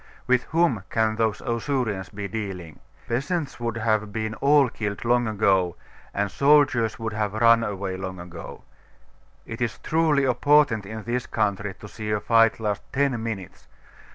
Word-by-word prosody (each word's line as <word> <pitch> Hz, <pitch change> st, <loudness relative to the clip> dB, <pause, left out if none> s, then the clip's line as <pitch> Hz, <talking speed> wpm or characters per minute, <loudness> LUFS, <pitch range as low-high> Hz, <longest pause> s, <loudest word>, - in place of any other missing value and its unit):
With 125 Hz, -1 st, +2 dB
whom 160 Hz, -, +1 dB
can 110 Hz, -1 st, +1 dB
those 110 Hz, -2 st, 0 dB
Ausurians 115 Hz, -6 st, -2 dB
be 100 Hz, 0 st, -5 dB
dealing? 95 Hz, -6 st, -6 dB, 0.3 s
Peasants 140 Hz, +4 st, -2 dB
would 115 Hz, -1 st, -3 dB
have 110 Hz, -2 st, 0 dB
been 110 Hz, +1 st, -3 dB
all 140 Hz, +3 st, +4 dB
killed 105 Hz, -2 st, -5 dB
long 120 Hz, 0 st, +2 dB
ago, 95 Hz, -5 st, +2 dB, 0.4 s
and 100 Hz, -1 st, -1 dB
soldiers 140 Hz, -6 st, +3 dB
would 110 Hz, -1 st, -4 dB
have 105 Hz, -1 st, -2 dB
run 115 Hz, +1 st, +5 dB
away 100 Hz, -3 st, -3 dB
long 95 Hz, -1 st, -6 dB
ago. 85 Hz, -1 st, -9 dB, 0.8 s
It 115 Hz, +1 st, -7 dB
is 120 Hz, -, -1 dB
truly 155 Hz, -3 st, +2 dB
a 130 Hz, -2 st, +3 dB
portent 145 Hz, -8 st, +3 dB
in 110 Hz, +1 st, -7 dB
this 120 Hz, +2 st, -2 dB
country 105 Hz, -2 st, -1 dB
to 105 Hz, -, -11 dB
see 110 Hz, +1 st, -7 dB
a 105 Hz, -1 st, +1 dB
fight 115 Hz, +1 st, +3 dB
last 105 Hz, -2 st, -2 dB
ten 135 Hz, -4 st, 0 dB
minutes. 110 Hz, -5 st, -6 dB
110 Hz, 160 wpm, -24 LUFS, 105-125 Hz, 0.8 s, run